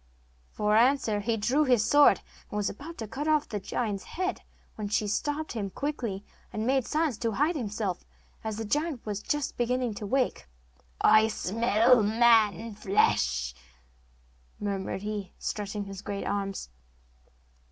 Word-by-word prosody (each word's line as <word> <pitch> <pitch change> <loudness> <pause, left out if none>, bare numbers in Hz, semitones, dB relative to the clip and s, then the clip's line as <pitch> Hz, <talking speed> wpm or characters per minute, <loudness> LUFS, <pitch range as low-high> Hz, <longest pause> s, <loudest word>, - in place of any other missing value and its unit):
For 210 0 +1
answer 235 -2 +3
he 225 +2 -1
drew 255 +8 +2
his 245 -6 +3
sword, 290 0 +6 0.3
and 210 - -4
was 205 - 0
about 315 +10 -10
to 220 - -5
cut 280 +8 -4
off 305 -1 +2
the 210 - -3
giant's 205 -1 -3
head, 370 +1 -3 0.3
when 210 -1 -5
she 210 +1 +1
stopped 295 +9 -2
him 205 -4 -3
quickly, 230 -5 -4 0.3
and 215 +1 -3
made 265 0 +1
signs 305 -7 0
to 230 -2 -1
hide 300 - +1
himself, 210 - -3 0.4
as 220 -1 -3
the 225 - -3
giant 295 +2 -1
was 210 -1 -3
just 295 +3 -2
beginning 245 -1 0
to 205 0 -6
wake. 245 - 0 0.5
'I 220 0 +6
smell 225 +3 +3
the 210 -2 +2 0.7
flesh 65 - +1 1.1
of - - -24
a - - 0
man!' 200 - 0
murmured 190 +1 -4
he, 205 -3 -4
stretching 205 0 -3
his 195 -1 -8
great 200 -1 -4
arms. 195 - -3
220 Hz, 160 wpm, -28 LUFS, 205-265 Hz, 1.1 s, sword